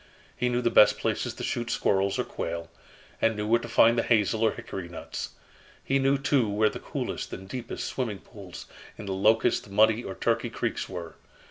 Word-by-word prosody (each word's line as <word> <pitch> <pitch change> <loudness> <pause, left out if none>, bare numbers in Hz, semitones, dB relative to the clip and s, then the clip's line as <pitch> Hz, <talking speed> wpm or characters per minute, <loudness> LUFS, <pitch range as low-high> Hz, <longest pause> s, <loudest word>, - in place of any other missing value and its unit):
He 125 - 0
knew 125 0 0
the 120 - +2
best 105 - +6
places - - -1
to - - -7
shoot 120 -1 -2
squirrels 95 -2 +1
or - - +1
quail, 85 0 -5 0.5
and 115 0 +3
knew 105 0 -3
where 115 +2 +3
to 120 - -7
find 115 0 +5
the - - +4
hazel 110 -1 +2
or 110 - +5
hickory 90 -3 -7
nuts. 85 - -6 0.5
He 135 - +1
knew, 135 +1 +3
too, 135 -4 +2
where 105 +1 +3
the - - -7
coolest - - -4
and 95 +1 -7
deepest 120 +3 -5
swimming 115 -6 -3
pools 95 -3 -11 0.3
in 105 - -8
the 95 - -2
Locust, 110 +3 +2
Muddy, 110 +3 +4
or 95 - -6
Turkey - - 0
creeks - - -3
were. 85 -4 -7
110 Hz, 200 wpm, -27 LUFS, 95-120 Hz, 0.5 s, best